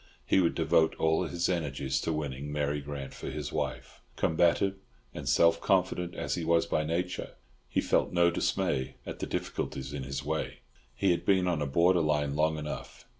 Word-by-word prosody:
He - - +4
would 85 -3 +2
devote 80 0 +3
all 80 +3 +2
his 85 +1 -1
energies 70 -6 -1
to 80 - -1
winning 75 -2 -3
Mary 75 0 -1
Grant 70 -1 -6
for - - -6
his 75 -2 -5
wife; - - -4
combative 85 +4 +2 0.4
and - - -4
self 85 0 +4
confident 90 -2 +1
as - - -2
he 85 - -2
was 85 0 +3
by 75 - 0
nature, 90 +3 -3 0.3
he - - +1
felt - - +1
no 85 0 +4
dismay 65 -5 0
at - - -6
the - - -3
difficulties 65 +1 -3
in 70 - -4
his 70 +1 -4
way. 80 +1 -3 0.3
He 100 -2 +2
had 85 - 0
been 95 -2 +3
on 85 -4 0
a 75 - 0
borderline 75 -2 +2
long 80 +1 +2
enough. 75 -1 -7
80 Hz, 180 wpm, -30 LUFS, 75-85 Hz, 0.4 s, He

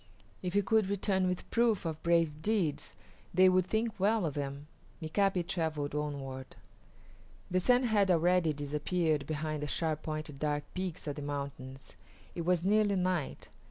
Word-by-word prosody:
If 180 -1 -3
he 205 - +4
could 215 0 +2
return 195 -1 +1
with 180 0 -3
proof 230 -5 +2
of 160 -1 -3
brave 165 -3 +2
deeds, 195 -7 -1 0.4
they 185 +1 +7
would 185 0 +2
think 220 +1 -1
well 210 0 +2
of 150 - -2
him. 140 0 -4 0.3
Mika´pi 180 +2 +1
travelled 155 -5 -2
onward. 140 -3 -4 1.0
The 185 - +3
sun 245 +6 +4
had 210 -5 +3
already 175 -1 +3
disappeared 150 +1 -1
behind 155 -1 -2
the 150 - -2
sharp 155 0 -1
pointed 155 -2 -5
dark 145 -1 0
peaks 185 -3 -4
of 145 -1 -4
the - - -4
mountains. 140 -2 -6 0.4
It 170 - -4
was 175 -1 +2
nearly 205 +1 +3
night. 180 -5 -1
170 Hz, 160 wpm, -32 LUFS, 150-190 Hz, 1.0 s, they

